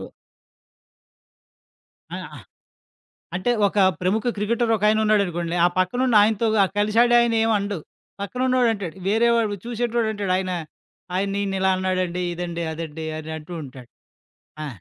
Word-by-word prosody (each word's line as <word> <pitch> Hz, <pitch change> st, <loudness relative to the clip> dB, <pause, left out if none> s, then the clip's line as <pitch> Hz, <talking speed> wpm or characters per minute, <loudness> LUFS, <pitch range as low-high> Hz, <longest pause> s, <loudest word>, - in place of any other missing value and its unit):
ఓ -, -, -7 dB, 2.1 s
ఆహ్, -, -, -6 dB
ఆ! -, -, -10 dB, 1.0 s
అంటే, 185 Hz, +7 st, 0 dB, 0.2 s
ఒక 200 Hz, +1 st, -2 dB, 0.2 s
ప్రముఖ 200 Hz, +5 st, 0 dB
క్రికెటర్ 225 Hz, +3 st, 0 dB
ఒకాయనున్నాడనుకోండి. 205 Hz, -5 st, +1 dB
ఆ -, -, +7 dB
పక్కనున్నాయనతో 220 Hz, +1 st, +3 dB, 0.3 s
కలిసాడు. 230 Hz, +4 st, +3 dB
ఆయనేం 225 Hz, -1 st, +2 dB
అనడు. 200 Hz, -2 st, -3 dB, 0.4 s
పక్కనున్నోడంటాడు. 230 Hz, -4 st, 0 dB
వేరే 225 Hz, +3 st, +3 dB
వాడు, 220 Hz, -3 st, +1 dB
చూసేటోడంటాడు. 225 Hz, -4 st, -1 dB
ఆయన, 185 Hz, -1 st, -2 dB, 0.6 s
ఆయన 195 Hz, +1 st, 0 dB
నిన్నిలా 195 Hz, -1 st, 0 dB
అన్నాడండి. 185 Hz, -1 st, -1 dB
ఇదండి, 170 Hz, -1 st, -4 dB
అదండి 160 Hz, 0 st, -6 dB
అనంటూ 160 Hz, +2 st, -7 dB
ఉంటాడు. 130 Hz, -3 st, -11 dB, 0.8 s
ఆ! -, -, -4 dB
200 Hz, 105 wpm, -23 LUFS, 180-225 Hz, 2.1 s, ఆ